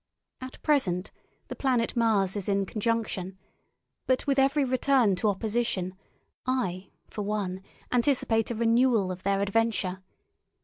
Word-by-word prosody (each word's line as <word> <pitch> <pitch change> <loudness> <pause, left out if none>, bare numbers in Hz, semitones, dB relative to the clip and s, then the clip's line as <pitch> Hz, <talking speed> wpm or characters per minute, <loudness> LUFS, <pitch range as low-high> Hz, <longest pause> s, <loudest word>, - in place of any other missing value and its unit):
At 255 0 -8
present 190 - +1 0.4
the - - -6
planet 250 -4 0
Mars 215 -5 +2
is 205 -1 -3
in 200 0 +1
conjunction, 215 -3 -2 0.7
but 255 0 +1
with 275 -1 +2
every 275 +1 +3
return 255 -5 +3
to 215 - 0
opposition 205 -3 -1 0.5
I, 195 -8 -2 0.2
for 210 - -6
one, 200 -3 -2 0.3
anticipate 240 -3 +2
a 240 - -2
renewal 230 -3 +3
of 185 0 -7
their 195 0 +1
adventure. 200 -3 0
220 Hz, 130 wpm, -27 LUFS, 195-250 Hz, 0.7 s, every